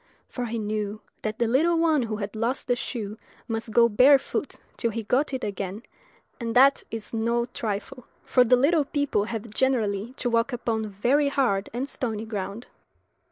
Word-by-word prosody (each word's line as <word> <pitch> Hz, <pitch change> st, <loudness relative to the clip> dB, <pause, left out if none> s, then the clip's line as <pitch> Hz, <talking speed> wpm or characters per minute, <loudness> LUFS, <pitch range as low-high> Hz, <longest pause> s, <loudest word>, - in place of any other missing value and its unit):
for 245 Hz, -, -4 dB
he 230 Hz, +1 st, -3 dB
knew 210 Hz, -1 st, -3 dB, 0.2 s
that 215 Hz, 0 st, -3 dB
the 235 Hz, -, +1 dB
little 320 Hz, +8 st, +3 dB
one 320 Hz, -3 st, +3 dB
who 225 Hz, -2 st, -2 dB
had 210 Hz, 0 st, -5 dB
lost 230 Hz, +4 st, -1 dB
the 245 Hz, -, +1 dB
shoe 220 Hz, -4 st, -5 dB, 0.3 s
must 225 Hz, -1 st, -3 dB
go 235 Hz, +2 st, +5 dB
barefoot 265 Hz, +5 st, +3 dB, 0.2 s
till 235 Hz, -, 0 dB
he 225 Hz, 0 st, -4 dB
got 260 Hz, +8 st, +1 dB
it 260 Hz, -1 st, -3 dB
again; 200 Hz, +1 st, -4 dB, 0.6 s
and 230 Hz, -1 st, -3 dB
that 275 Hz, +2 st, +6 dB
is 225 Hz, 0 st, -6 dB
no 235 Hz, +1 st, +1 dB
trifle, 230 Hz, +2 st, -5 dB, 0.2 s
for 250 Hz, -, +4 dB
the 250 Hz, +1 st, +5 dB
little 295 Hz, +5 st, +3 dB
people 285 Hz, -8 st, 0 dB
have 225 Hz, -1 st, -5 dB
generally 225 Hz, -3 st, 0 dB
to 260 Hz, -, -3 dB
walk 230 Hz, +2 st, +1 dB
upon 230 Hz, -3 st, -2 dB
very 255 Hz, +9 st, +2 dB
hard 240 Hz, -9 st, +1 dB
and 250 Hz, +4 st, -3 dB
stony 225 Hz, -5 st, -3 dB
ground. 205 Hz, +1 st, -5 dB
235 Hz, 175 wpm, -26 LUFS, 215-260 Hz, 0.6 s, that